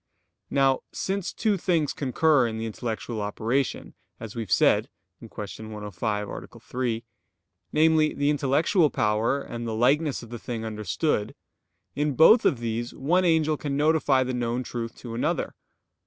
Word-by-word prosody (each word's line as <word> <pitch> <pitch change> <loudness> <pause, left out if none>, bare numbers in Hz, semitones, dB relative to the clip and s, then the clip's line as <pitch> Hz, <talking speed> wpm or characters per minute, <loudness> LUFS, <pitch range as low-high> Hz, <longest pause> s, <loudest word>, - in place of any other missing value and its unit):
Now 135 -1 +3
since 195 -1 -2
two 215 -3 0
things 165 -5 +1
concur 140 -1 +2
in 110 -1 -4
the 110 - -3
intellectual 115 0 -4
operation, 115 +6 -2 0.3
as 110 -1 -8
we 115 - -3
have 105 - -7
said - - +4 0.3
(Q. - - -11
105, 105 0 -4
A. - - -7
3), 120 -3 -3 0.7
namely, 155 0 +4
the 145 +1 +2
intellectual 150 +4 +2
power, 110 +4 +1
and 120 0 -6
the 110 - -2
likeness 135 +4 +2
of 115 - -12
the 120 - -6
thing 115 -1 -5
understood; 105 - -1 0.6
in 145 -1 -1
both 220 - +7
of 135 - +3
these 115 0 -3
one 175 +7 +2
angel 160 -2 +2
can 140 -1 -3
notify 145 -3 +3
the 130 0 -3
known 120 0 -1
truth 115 -2 -5
to 120 -2 -8
another. 115 - -1
125 Hz, 155 wpm, -26 LUFS, 115-150 Hz, 0.7 s, both